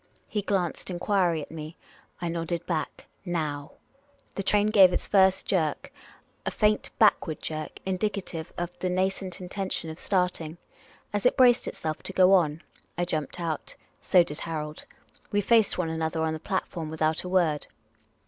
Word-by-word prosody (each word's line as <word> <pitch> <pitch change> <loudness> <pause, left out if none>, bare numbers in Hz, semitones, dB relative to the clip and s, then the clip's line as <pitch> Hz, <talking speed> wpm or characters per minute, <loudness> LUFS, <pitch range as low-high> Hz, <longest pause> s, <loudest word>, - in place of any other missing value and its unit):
He 210 - -1
glanced 190 -4 -1
enquiry 175 -3 +1
at - - -12
me. 155 +1 -8 0.5
I - - 0
nodded 170 0 -2
back, 165 -3 -3
" - - -40 0.2
Now! 145 -2 -4 0.3
" 285 -1 -36
The - - -3
train 205 +2 +3
gave 195 -4 +8
its - - -1
first 190 -2 +4
jerk, 160 -5 -1 0.5
a - - -1
faint 210 -1 +1
backward 185 -7 +3
jerk, 155 -1 -5
indicative 190 -4 -2
of 175 0 -2
the 185 - -1
nascent 185 0 -1
intention 185 -2 -3
of 160 - -10
starting. 180 -4 0 0.6
As 205 - -1
it - - +1
braced 250 -2 +5
itself 155 -1 -4
to 195 - -6
go 185 0 +6
on, 165 -3 +3 0.3
I 175 - +1
jumped 155 0 -3
out; 165 -3 -3 0.3
so 180 -3 +5
did 150 -3 -4
Harold. 155 -2 -5 0.4
We 205 - +2
faced 220 0 +4
one 175 -3 0
another 160 0 -1
on 160 0 0
the 160 - -4
platform 165 -2 -3
without 155 0 0
a 180 - -5
word. 170 -5 +2
175 Hz, 165 wpm, -27 LUFS, 160-195 Hz, 0.6 s, gave